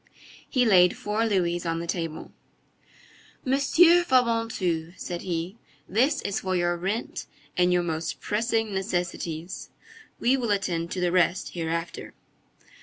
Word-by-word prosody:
He 250 -2 +2
laid 180 -5 +5
four 215 +2 0
louis 175 -4 0
on 165 -1 -1
the 170 - -4
table. 165 -2 -4 1.1
"Monsieur 330 +6 +5
Fabantou," 230 - +1
said 175 -1 -5
he, 175 +3 -3 0.3
"this 250 - +2
is 200 - -1
for 185 -1 -2
your 175 -1 +1
rent 195 +7 -3 0.3
and 180 0 +3
your 180 0 +3
most 165 -1 -3
pressing 225 0 0
necessities. 175 -3 -3 0.5
We 250 +3 +3
will 240 -4 -2
attend 175 -5 0
to 185 - -3
the 175 -1 +1
rest 180 0 +2
hereafter." 165 0 -4
180 Hz, 130 wpm, -26 LUFS, 170-225 Hz, 1.1 s, laid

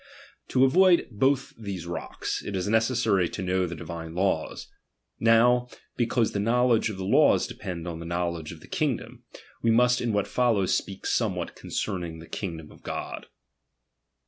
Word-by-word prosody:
To 130 +1 +4
avoid 180 +5 +5
both 135 +5 +1
these 100 -6 -5
rocks, 85 - -4
it 100 - -4
is 95 +1 -1
necessary 110 -5 +2
to 95 - -5
know 95 0 +1
the 85 - -5
divine 80 0 -7
laws. 90 -4 -1 0.5
Now 120 +2 +4 0.3
because 120 -1 +1
the 100 - -2
knowledge 115 +1 +3
of 105 - -6
the 95 - -4
laws - - +4
depends 90 -2 -6
on 85 -1 -5
the 85 - -7
knowledge 85 -2 -2
of - - -11
the - - -14
king - - 0
dom, - - -12 0.4
we 115 - +2
must 125 +2 +4
in 120 - 0
what 105 -1 0
follows 115 -7 +2
speak 95 -1 -4
somewhat - - -1
concerning 90 -5 -4
the 80 - -10
kivgdom 80 -4 -6
of - - -17
God. - - -5
100 Hz, 170 wpm, -27 LUFS, 85-120 Hz, 0.5 s, avoid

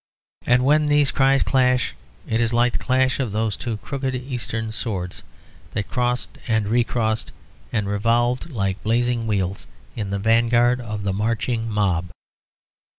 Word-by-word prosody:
And 125 +1 +4
when 150 +2 +4
these 145 -1 +3
cries 135 0 +3
clash 125 -2 +2 0.3
it 115 +1 +1
is 115 -1 +1
like 120 +1 +3
the - - -1
clash 130 +1 +1
of 125 -6 -1
those 110 0 0
two 115 -3 -4
crooked 135 +2 -3
Eastern 120 -3 -4
swords, 95 -6 -3 0.5
that 105 -2 -3
crossed 125 0 -1
and 110 -3 +1
recrossed 115 -1 0 0.4
and 105 -3 -1
revolved 120 +7 +1
like 100 -8 -2
blazing 120 +1 0
wheels, 95 -3 -1 0.3
in 105 -4 -3
the 100 - -1
vanguard 120 +3 +3
of 110 -3 -5
the 100 -1 0
marching 115 +2 -1
mob. 95 -5 0
115 Hz, 150 wpm, -22 LUFS, 105-125 Hz, 0.5 s, And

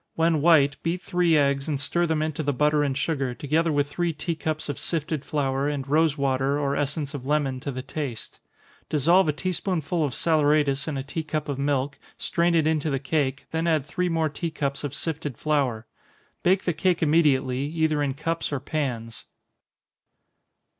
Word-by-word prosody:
When 165 -2 +2
white, 145 -4 +5
beat 175 +2 -2
three 175 -3 +2
eggs, 140 -1 +1
and 145 -3 -1
stir 170 +5 0
them 160 -1 +1
into 155 0 -2
the 145 -1 0
butter 150 +2 +2
and 140 -2 0
sugar, 135 -4 -1
together 155 +5 +1
with 145 -1 +1
three 170 +4 -1
tea 165 +3 -3
cups 155 -1 -3
of 145 - -4
sifted 155 -3 -2
flour, 140 -2 -1
and 140 -2 -3
rosewater 140 -3 +2
or 140 -1 0
essence 145 0 -2
of 135 -2 -6
lemon 140 -3 +1
to 140 +2 -4
the 130 0 -5
taste. 135 -4 -6 0.5
Dissolve 165 +4 +4
a - - +5
tea 185 +5 -3
spoonful 175 -2 -1
of 140 -5 -2
saleratus 150 -3 +2
in 150 -3 -2
a 135 - -3
tea 145 +4 -4
cup 155 -1 -3
of 140 -2 -3
milk, 140 0 -1 0.2
strain 170 0 +1
it 160 -2 +3
into 155 -1 +1
the 135 - 0
cake, 135 -1 -1
then 165 +1 -1
add 155 -4 +2
three 180 +5 -1
more 165 -1 +1
tea 160 +3 -3
cups 140 -3 -3
of 145 -1 -4
sifted 150 -6 -4
flour. 135 -7 0 0.6
Bake 190 +2 +3
the 175 - 0
cake 175 +1 +1
immediately, 145 -5 +3
either 160 -1 0
in 140 -2 -1
cups 165 +2 -2
or 140 - -1
pans. 120 -7 -4
150 Hz, 190 wpm, -25 LUFS, 140-160 Hz, 0.6 s, white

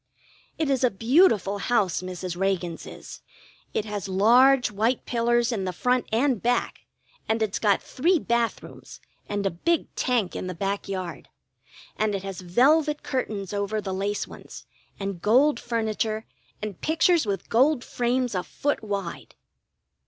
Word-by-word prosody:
It 315 - 0
is 265 -1 +1
a 250 - +5
beautiful 225 - +3
house, 205 -5 +1
Mrs. 185 -1 -5
Reagan's 180 -3 -2
is. - - -10 0.5
It 215 - -1
has 205 -2 -4
large 245 +7 +5
white 225 +5 0
pillars 240 0 +1
in 210 -5 -2
the 185 - -2
front 250 +7 0
and 245 0 +1
back, 245 +1 -1 0.4
and 220 +1 +2
it's 210 -2 -2
got 205 -2 +2
three 340 +7 +2
bath 235 -5 0
rooms, - - -12 0.3
and 205 -1 -2
a 195 - +1
big 325 - -1
tank 240 -7 0
in - - -4
the 185 - -5
back 200 +3 -3
yard. 185 -3 -5 0.7
And 215 -1 +1
it 195 - -4
has 195 -1 -6
velvet 290 - +3
curtains 210 -7 -3
over 205 +1 -1
the 195 -2 -4
lace 200 +2 -2
ones, - - -11 0.3
and 195 -3 -4
gold 255 +6 +4
furniture 220 -1 -2 0.4
and 210 -4 -5
pictures 325 -3 +3
with 195 -3 -2
gold 260 +3 +3
frames 245 0 -1
a 180 - 0
foot 290 +6 -2
wide. 200 -4 -5
215 Hz, 155 wpm, -25 LUFS, 195-250 Hz, 0.7 s, a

